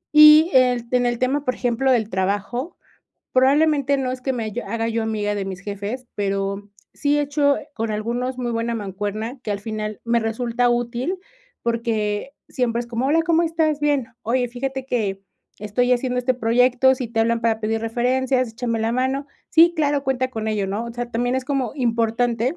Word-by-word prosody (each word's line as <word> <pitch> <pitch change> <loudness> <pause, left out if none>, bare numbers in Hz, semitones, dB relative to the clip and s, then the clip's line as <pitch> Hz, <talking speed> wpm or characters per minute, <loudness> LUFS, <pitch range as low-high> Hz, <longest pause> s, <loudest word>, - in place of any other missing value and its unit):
Y, 305 +3 +9
eh, 255 -1 +5
en 250 -1 +2
el 240 0 0
tema, 265 +4 0
por 255 -3 -1
ejemplo, 245 +2 +1
del 225 -4 +1
trabajo, 205 - -2 0.6
probablemente 280 +1 +3
no 260 -1 -1
es 255 0 -5
que 265 - 0
me 240 -3 -3
haya 220 +3 -4
haga 230 0 -1
yo 230 0 -1
amiga 210 -2 -1
de 200 -1 -2
mis 190 -1 -6
jefes, 205 +5 -5
pero 200 0 -2 0.2
sí 290 0 +1
he - - +2
hecho 285 0 +2 0.2
con 225 0 -2
algunos 240 +4 -2
muy 245 -1 -2
buena 230 0 -1
mancuerna 210 +4 -4
que 215 - -4
al 200 -1 -2
final 215 0 -5
me 235 0 +1
resulta 235 +2 0
útil 240 +9 -1 0.4
porque 230 0 -1 0.2
siempre 235 -3 -1
es 240 - -6
como: 235 +1 -2
"Hola, 300 +5 +3
¿cómo 335 0 +2
estás? 320 -3 0
'Bien'. 290 -4 +1 0.2
Oye, 245 +2 0
fíjate 265 +2 -4
que 205 -7 -1 0.4
estoy 215 +5 +1
haciendo 250 0 0
este 250 +1 +1
proyecto, 250 +2 +3
si 255 -1 -4
te 225 0 -1
hablan 230 +1 +1
para 225 -1 +1
pedir 220 +1 -1
referencias, 255 +2 +1
échame 230 0 -3
la 225 +1 0
mano. 260 +3 -1 0.2
'Sí, 335 +2 +6
claro, 290 -2 +1
cuenta 260 -1 0
con 220 -3 -3
ello,'" 210 -2 -1
¿no? 205 +5 -3
O 235 - -7
sea, 240 0 -4
también 245 +2 0
es 260 0 -1
como 270 -4 -1
importante, 235 +1 0
240 Hz, 190 wpm, -22 LUFS, 225-260 Hz, 0.6 s, Y